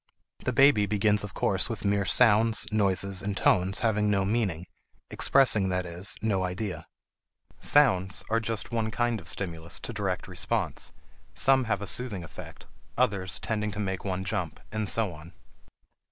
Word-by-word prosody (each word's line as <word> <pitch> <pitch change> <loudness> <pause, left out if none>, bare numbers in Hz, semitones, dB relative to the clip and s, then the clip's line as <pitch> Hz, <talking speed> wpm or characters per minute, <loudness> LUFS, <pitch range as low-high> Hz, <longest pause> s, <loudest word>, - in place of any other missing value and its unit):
The - - -2
baby 130 -6 +4
begins 105 0 +1
of 105 - -8
course 95 +3 +2
with 115 -2 -5
mere 100 0 +1
sounds, 110 +3 +4
noises, 100 -2 +1
and 100 -1 -3
tones 95 +2 +2
having 105 -2 +1
no 100 -2 +1
meaning, 95 -6 -1 0.5
expressing, 110 -8 +3
that 90 0 -1
is, 90 +3 0
no 100 -4 +1
idea. 90 +2 -4 0.7
Sounds 100 -10 +3
are 115 +1 +1
just 115 0 -4
one 115 -2 -1
kind 120 0 -1
of 95 - -12
stimulus 85 -3 -3
to 120 - -6
direct 100 -4 -3
response, - - -3 0.4
some 135 -1 +3
having 105 -3 -2
a - - -3
soothing 105 -6 -1
effect, 80 - -11 0.3
others 100 -6 0
tending 105 -1 -2
to 105 - -7
make 95 -2 -3
one 95 -1 -3
jump, 95 -5 -3
and 110 -2 -2
so 110 -6 0
on. 75 +3 -13
100 Hz, 160 wpm, -27 LUFS, 95-110 Hz, 0.7 s, baby